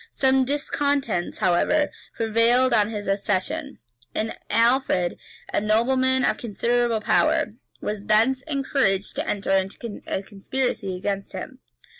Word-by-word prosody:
Some 265 -1 +3
discontents, 280 - -1
however, 185 - +2 0.2
prevailed 230 +3 +3
on 210 -2 +3
his 210 -2 -5
accession; 205 +9 -1 0.4
and 220 +1 -1
Alfred, 230 -7 +2 0.3
a - - +2
nobleman 260 +5 +2
of - - +1
considerable 235 0 0
power, - - +2 0.3
was 205 -1 -4
thence 230 +5 +3
encouraged 270 -9 0
to - - -2
enter 200 -1 -1
into 195 +3 -1
a 190 - -2
conspiracy 200 -1 -3
against 195 +1 -3
him. 225 +7 -7
230 Hz, 120 wpm, -24 LUFS, 200-260 Hz, 0.4 s, Some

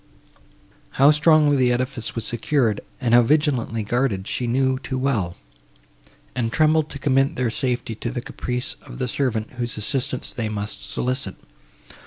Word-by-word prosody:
How 140 +3 +7
strongly 150 -1 +5
the 125 -2 +3
edifice 125 -1 -2
was 115 - -1
secured, 120 -2 +1 0.2
and 120 -3 0
how 120 - +8
vigilantly 125 -4 +1
guarded, 110 -3 0
she 125 - -1
knew 130 +2 +1
too 130 0 -4
well; 115 -10 -1 1.0
and 115 -2 -1
trembled 155 +2 +3
to 140 - -6
commit 135 0 +2
their 125 -2 0
safety 125 -2 -1
to 115 +2 -4
the 120 - -3
caprice 125 0 -4
of 130 -3 -11
the 130 -1 -1
servant, 115 -4 -1
whose 120 -2 -2
assistance 130 +3 -2
they 115 -3 -2
must 105 0 -5
solicit. 125 -6 -2
125 Hz, 155 wpm, -23 LUFS, 115-135 Hz, 1.0 s, how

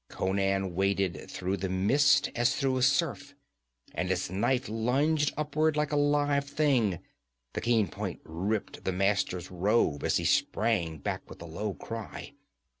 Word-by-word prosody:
Conan 95 -1 0
waded 95 0 0
through 95 +2 -2
the 95 0 -3
mist 120 +11 +3
as 120 +4 +2
through 135 -2 0
a - - -1
surf, 140 +1 +1 0.6
and 90 0 -2
his 95 -1 -1
knife 125 +7 0
lunged 140 +7 +1
upward 150 +1 +1
like 150 0 0
a - - +1
live 145 -1 +2
thing. 135 - +1 0.6
The - - -3
keen 115 -4 +2
point - - -5
ripped 95 +7 -3
the 95 - -1
Master's 95 -2 0
robe 90 -5 +1
as - - +2
he - - -2
sprang 95 -8 +1
back 70 - -4
with - - -11
a 85 - -8
low 95 +5 -4
cry. 115 +4 -7
110 Hz, 155 wpm, -29 LUFS, 95-140 Hz, 0.6 s, mist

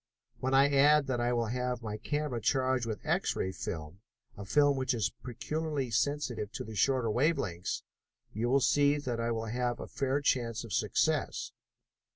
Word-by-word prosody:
When 130 +2 0
I 140 +1 +5
add 145 +1 +5
that 125 -3 -1
I 120 0 +1
will 120 -1 +1
have 125 0 -2
my 105 -1 -4
camera 145 -1 -2
charged 130 0 +1
with 110 -2 -5
X - - +1
ray 95 - -1
film, 80 0 -6 0.4
a 100 - -8
film 145 +6 +4
which 130 -1 0
is 110 -2 -1
peculiarly 145 +1 -3
sensitive 120 -4 -1
to - - -4
the 110 - -8
shorter 120 +2 +2
wave 150 +9 +2
lengths, 90 -1 -3 0.5
you 115 +3 -1
will 135 +2 +4
see 145 +2 +3
that 125 -5 -3
I 115 0 0
will 115 -1 -2
have 120 +2 -2
a - - -5
fair 135 +1 -1
chance 120 -4 0
of 115 -6 -7
success." - - 0
125 Hz, 185 wpm, -31 LUFS, 110-140 Hz, 0.5 s, I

